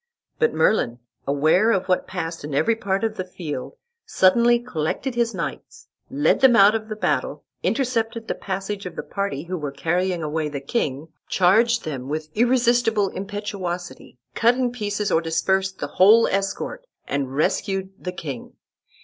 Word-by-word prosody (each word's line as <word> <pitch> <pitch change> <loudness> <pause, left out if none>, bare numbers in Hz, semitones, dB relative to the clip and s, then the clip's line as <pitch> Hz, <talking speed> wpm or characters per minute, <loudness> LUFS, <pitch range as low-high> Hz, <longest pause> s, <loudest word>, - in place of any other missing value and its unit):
But 465 0 +3
Merlin, 120 - +2 0.3
aware 155 +9 +3
of 195 -5 +1
what 185 -1 +1
passed 165 -3 -5
in 145 -1 -4
every 230 +10 +2
part 195 -2 -2
of 220 -1 -1
the 185 - -2
field, 160 -7 -6 0.3
suddenly 235 +6 +4
collected 240 - -3
his 235 -1 0
knights, 440 -1 -6 0.2
led 280 +2 +2
them 260 -3 +7
out 205 -1 +7
of 220 -1 -3
the 215 - -3
battle, 150 -6 -1 0.2
intercepted 230 - -1
the - - 0
passage 195 0 -4
of - - -9
the - - -4
party 200 -8 -3
who 180 +1 -4
were 150 -2 -3
carrying 175 +4 -1
away 155 0 -2
the 145 -1 -4
king, 140 - -2 0.2
charged 225 +6 +3
them 135 -4 -5
with 155 +1 -3
irresistible 240 -3 +2
impetuosity, 190 -7 -5 0.2
cut 235 +2 +3
in 250 -1 0
pieces 210 -3 -2
or 160 - +3
dispersed 190 +4 0
the - - -3
whole 215 +5 +5
escort, 200 - -2 0.2
and 135 -2 -2
rescued 190 +5 0
the 180 - -3
king. 150 -9 -7
195 Hz, 160 wpm, -23 LUFS, 160-225 Hz, 0.3 s, them